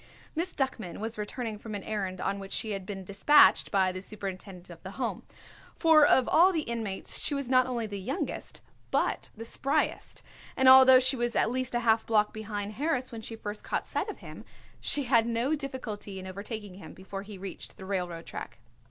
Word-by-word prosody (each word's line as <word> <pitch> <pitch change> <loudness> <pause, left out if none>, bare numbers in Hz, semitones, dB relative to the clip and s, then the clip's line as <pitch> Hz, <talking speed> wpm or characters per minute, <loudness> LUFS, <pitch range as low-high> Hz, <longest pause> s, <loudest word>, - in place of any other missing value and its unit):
Miss 345 +3 -2
Duckman 230 -9 -2
was 220 +1 -4
returning 215 0 -4
from 215 -1 -7
an 200 - -5
errand 195 -3 -3
on 200 0 -2
which 195 0 -7
she 220 - -2
had 195 -2 -5
been 195 -2 -6
dispatched 200 +11 +5
by 190 -2 +2
the 185 0 -6
superintendent 190 -3 -7
of 165 - -12
the 190 +1 -9
Home, 250 -3 -2 0.5
for 320 -2 +6
of 255 - +4
all 360 +4 +6
the 320 -4 -1
inmates 225 -6 -3
she 290 - -1
was 280 -2 -3
not 255 0 +4
only 240 -3 -2
the 205 -2 -5
youngest 250 +9 -4 0.3
but - - 0
the 225 - -7
spryest, 280 +6 -1 0.3
and 265 - +4
although 260 0 +9
she 260 +1 +3
was 240 -1 -2
at - - +2
least 255 0 -1
half 230 -2 +3
a - - -26
block 210 -2 +2
behind 210 -1 -5
Harris 260 +1 -2
when 230 -1 -7
she 225 +1 -7
first 210 -1 -7
caught - - -2
sight - - -2
of - - -6
him, - - -9 0.4
she 290 - +1
had 235 -3 +3
no 235 +5 0
difficulty 255 -9 -5
in 190 - -7
overtaking 200 +1 -7
him 160 -5 -11
before 190 +1 -7
he 205 0 -10
reached 190 0 -8
the 190 - -9
railroad 180 -4 -3
track. - - -8
220 Hz, 205 wpm, -29 LUFS, 195-255 Hz, 0.5 s, although